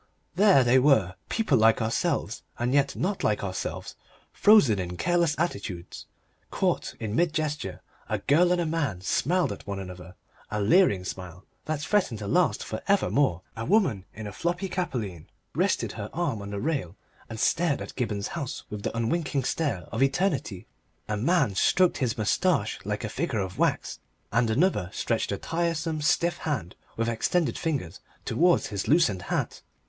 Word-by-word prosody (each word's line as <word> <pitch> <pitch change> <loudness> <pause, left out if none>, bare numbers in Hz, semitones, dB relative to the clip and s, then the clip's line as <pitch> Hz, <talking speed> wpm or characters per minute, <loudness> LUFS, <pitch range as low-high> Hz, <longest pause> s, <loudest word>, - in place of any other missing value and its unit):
There 190 -7 +5
they 125 +2 +5
were, 125 -10 +4 0.2
people 160 - +2
like 110 0 +5
ourselves 110 +1 -1 0.2
and 120 +2 0
yet 140 -1 +2
not 190 +2 -2
like 105 -1 +1
ourselves, 95 -1 -4 0.4
frozen 175 - +5
in 90 -1 -4
careless 170 - +2
attitudes, 100 - -4 0.4
caught - - -1
in 110 -1 -3
mid 170 +1 +2
gesture. 150 -1 -3 0.3
A - - 0
girl 175 +5 +3
and 180 - +2
a 170 - 0
man 145 - -1
smiled 170 - +1
at 100 - -8
one 100 -1 -3
another, 90 -1 -9 0.3
a 105 - -2
leering 105 - +4
smile 90 0 -7 0.2
that 155 -1 -2
threatened 185 - +1
to 105 -1 -6
last 180 - +2
for - - -5
evermore; 145 - +2
a 115 - -4
woman 165 - +2
in 110 - -8
a 105 - -5
floppy 175 - -2
capelline 115 - -4 0.3
rested - - +1
her - - -6
arm 110 - -1
on 100 - -7
the 100 0 -4
rail 130 - -2 0.3
and 110 -1 -6
stared 165 +2 +2
at - - -8
Gibberne's 105 -5 -2
house 145 -7 -5
with 105 -1 -5
the 115 - -3
unwinking 140 +4 0
stare 125 - -1
of - - -2
eternity; 135 - 0 0.4
a 105 - -1
man 135 - +2
stroked 180 - +3
his 120 -4 0
moustache 110 - +1
like 105 +2 -3
a - - -1
figure 140 +1 -2
of 95 -1 -5
wax, - - 0 0.3
and 115 +1 +2
another 110 - +1
stretched 115 0 -1
a 100 - -1
tiresome 165 - -2
stiff 170 +3 +2
hand 125 - -3 0.2
with 115 0 0
extended 145 +9 0
fingers 140 - -3 0.3
towards 175 +2 +3
his 100 -2 -3
loosened 135 - +3
hat. - - -3
125 Hz, 170 wpm, -27 LUFS, 105-170 Hz, 0.4 s, There